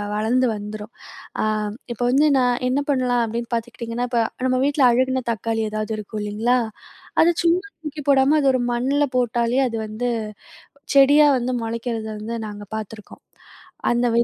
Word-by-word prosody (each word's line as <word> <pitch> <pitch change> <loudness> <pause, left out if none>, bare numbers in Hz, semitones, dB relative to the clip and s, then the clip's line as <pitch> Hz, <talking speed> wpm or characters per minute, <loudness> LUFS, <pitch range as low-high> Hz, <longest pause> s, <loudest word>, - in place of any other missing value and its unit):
வளர்ந்து 235 +4 +2
வந்துரும். 210 +1 -7 0.5
அ - - +1 0.5
இப்போ 240 - -4
வந்து 290 +4 +4
நான் 245 -1 +1
என்ன 260 +2 +1
பண்ணலாம் 250 -3 +1
அப்டின்னு 235 +2 -4
பார்த்துக்ட்டீங்கன்னா, 235 +1 -4
இப்போ 235 -1 +2 0.2
நம்ம 255 0 +1
வீட்ல 285 -1 +3
அழுகுன 260 +1 +1
தக்காளி 225 +1 -2
எதாவது 215 +1 -3
இருக்கும் 215 0 -6
இல்லிங்களா, 220 +4 +1 0.6
அத 340 +2 +5
சும்மா 345 +3 +2 0.2
தூக்கி 300 -1 -6
போடாம 275 +2 +5
அது 275 - +2
ஒரு 255 - +1
மண்ல 270 +4 +1
போட்டாலே 240 0 +1
அது 230 - -5
வந்து 220 +3 -3 0.9
செடியா 285 +2 +7
வந்து 250 +1 -2
மொளைக்கிறத 230 0 -3
வந்து 230 +2 -5
நாங்க 205 0 -8
பாத்துருக்கோம், 215 0 -9 0.7
அந்த 240 +1 +1
வை - - +5
240 Hz, 150 wpm, -22 LUFS, 225-260 Hz, 0.9 s, செடியா